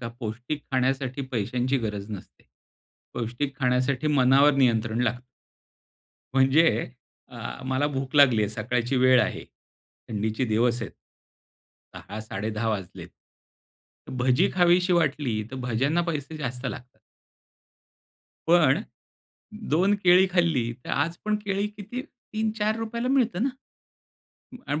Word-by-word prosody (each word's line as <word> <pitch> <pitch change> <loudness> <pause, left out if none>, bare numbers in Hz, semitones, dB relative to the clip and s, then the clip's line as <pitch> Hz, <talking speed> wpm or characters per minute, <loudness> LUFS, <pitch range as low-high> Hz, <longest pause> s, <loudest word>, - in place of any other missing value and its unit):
का? 115 - -4
पौष्टिक 120 +6 -4
खाण्यासाठी 130 +1 0
पैशांची 125 +4 0
गरज 105 -3 -4
नसते. 100 -3 -10 0.7
पौष्टिक 120 +4 -3
खाण्यासाठी 130 +2 +1
मनावर 140 0 +5
नियंत्रण 115 -4 +2
लागत. 125 +1 -1 1.1
म्हणजे, 135 +3 +3 0.4
अ, 125 - -13 0.3
मला 130 +2 +1
भूक 135 -2 -4
लागली 130 -7 +6
आहे 105 - 0
सकाळची 120 +4 -1
वेळ 130 0 +5
आहे. - - -3 0.6
थंडीचे 110 +3 -1
दिवस 120 +2 +1
आहेत. - - -6 1.0
10:00-10:30 110 +1 -4
वाजलेत. 100 -5 -5 1.0
भजी 125 0 +2
खावीशी 180 0 +4
वाटली 145 -9 +1
तर 130 - -6
भज्यांना 130 +6 0
पैसे 155 0 -4
जास्त 125 -3 -4
लागतात. 125 0 -8 1.5
पण, 165 -1 +4 0.9
2 185 +7 +3
केळी 180 +1 +6
खाल्ली 160 -10 +1
तर - - -6
आजपण 170 +8 -1
केळी 200 +1 0
किती 210 +4 -7
₹3-4 220 -1 -3
ला 250 - -1
मिळतात 245 -8 +1
ना? 270 - +2 1.2
आणि 145 +1 -1
130 Hz, 110 wpm, -26 LUFS, 120-165 Hz, 1.5 s, लागली